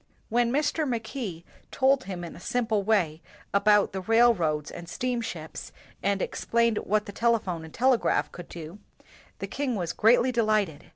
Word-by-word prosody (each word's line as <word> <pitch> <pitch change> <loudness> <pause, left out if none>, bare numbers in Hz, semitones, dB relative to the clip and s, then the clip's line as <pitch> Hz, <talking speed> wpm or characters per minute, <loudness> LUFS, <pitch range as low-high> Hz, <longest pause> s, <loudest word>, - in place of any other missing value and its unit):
When 235 +1 +2
Mr. 295 +2 0
Mackay 220 -7 -4 0.3
told 265 0 +2
him 185 -3 -5
in 170 - -8
a - - -11
simple 225 0 0
way 185 -7 +1 0.3
about 205 +1 +4
the 190 - -3
railroads 185 -9 +2
and 170 -1 -9
steamships, 230 -9 -4 0.3
and 200 -1 0
explained 235 -1 0
what 210 +1 0
the - - -7
telephone 205 -7 0
and 160 - -10
telegraph 250 +2 +2
could 175 -1 -10
do, 170 +3 -9 0.6
the - - -4
king 275 -4 -2
was 175 -4 -2
greatly 240 +3 +4
delighted. 215 -9 0
215 Hz, 155 wpm, -27 LUFS, 175-240 Hz, 0.6 s, about